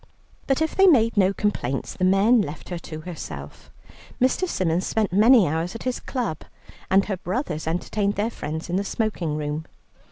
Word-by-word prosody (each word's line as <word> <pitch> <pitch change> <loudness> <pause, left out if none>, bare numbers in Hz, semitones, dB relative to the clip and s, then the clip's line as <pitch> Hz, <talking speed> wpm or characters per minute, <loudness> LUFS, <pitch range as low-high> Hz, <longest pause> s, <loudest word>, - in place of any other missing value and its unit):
But 270 +3 +2
if 320 - -2
they 390 0 +5
made 230 -9 +4
no 195 -2 +4
complaints, 195 - -2
the 185 - -4
men 205 +5 +4
left 150 -5 -6
her 175 -2 -4
to 155 -1 -8
herself. 80 - -8 0.5
Mr. 260 +9 +2
Symons 175 - 0
spent 215 -5 0
many 220 +1 +6
hours 165 +6 -2
at 230 - -7
his 255 -1 -2
club, 235 - -3 0.5
and 195 +1 +4
her 195 -3 -3
brothers 180 - -3
entertained 200 +5 -1
their 215 +3 -1
friends 160 -5 -5
in 175 - -1
the 200 - 0
smoking 195 -8 -2
room. 150 +1 -4
195 Hz, 180 wpm, -24 LUFS, 160-225 Hz, 0.5 s, many